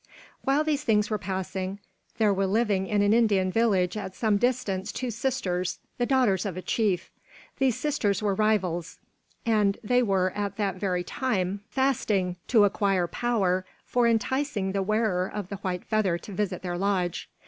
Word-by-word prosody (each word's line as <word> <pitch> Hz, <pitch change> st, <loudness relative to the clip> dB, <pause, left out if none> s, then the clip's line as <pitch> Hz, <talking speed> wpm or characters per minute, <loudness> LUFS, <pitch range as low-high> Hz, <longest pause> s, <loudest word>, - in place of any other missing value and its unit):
While 275 Hz, +3 st, +2 dB
these 300 Hz, -2 st, 0 dB
things 210 Hz, -2 st, +2 dB
were 215 Hz, -, 0 dB
passing, 190 Hz, 0 st, -3 dB, 0.4 s
there 215 Hz, -3 st, +3 dB
were 195 Hz, 0 st, +1 dB
living 200 Hz, -2 st, +1 dB
in 205 Hz, 0 st, +2 dB
an 205 Hz, +1 st, +4 dB
Indian 205 Hz, -5 st, +3 dB
village 195 Hz, -5 st, +2 dB
at 190 Hz, -3 st, -5 dB
some 215 Hz, -3 st, +2 dB
distance 215 Hz, -4 st, 0 dB
two 255 Hz, -2 st, -3 dB
sisters, 200 Hz, -7 st, -1 dB, 0.2 s
the 245 Hz, -, +1 dB
daughters 245 Hz, -9 st, +3 dB
of 190 Hz, -4 st, -4 dB
a -, -, -3 dB
chief. 200 Hz, -1 st, 0 dB, 0.5 s
These 265 Hz, -4 st, +2 dB
sisters 225 Hz, -10 st, 0 dB
were 205 Hz, -2 st, 0 dB
rivals, 190 Hz, -5 st, 0 dB, 0.5 s
and 210 Hz, -3 st, +2 dB
they 245 Hz, +3 st, +3 dB
were 190 Hz, -5 st, +1 dB
at 200 Hz, 0 st, -3 dB
that 195 Hz, -3 st, -1 dB
very 180 Hz, -2 st, -1 dB
time 200 Hz, -4 st, -1 dB
fasting 210 Hz, -9 st, 0 dB
to 225 Hz, -4 st, +5 dB
acquire 195 Hz, -2 st, +2 dB
power 190 Hz, -3 st, 0 dB, 0.2 s
for 245 Hz, -1 st, +2 dB
enticing 230 Hz, -2 st, 0 dB
the 195 Hz, 0 st, 0 dB
wearer 200 Hz, -3 st, +1 dB
of 205 Hz, -3 st, -5 dB
the 200 Hz, -, -5 dB
white 185 Hz, -2 st, -4 dB
feather 210 Hz, -6 st, +1 dB
to 200 Hz, +4 st, -10 dB
visit 190 Hz, -2 st, -2 dB
their 175 Hz, -1 st, -3 dB
lodge. 185 Hz, -3 st, -1 dB
200 Hz, 170 wpm, -27 LUFS, 185-225 Hz, 0.5 s, to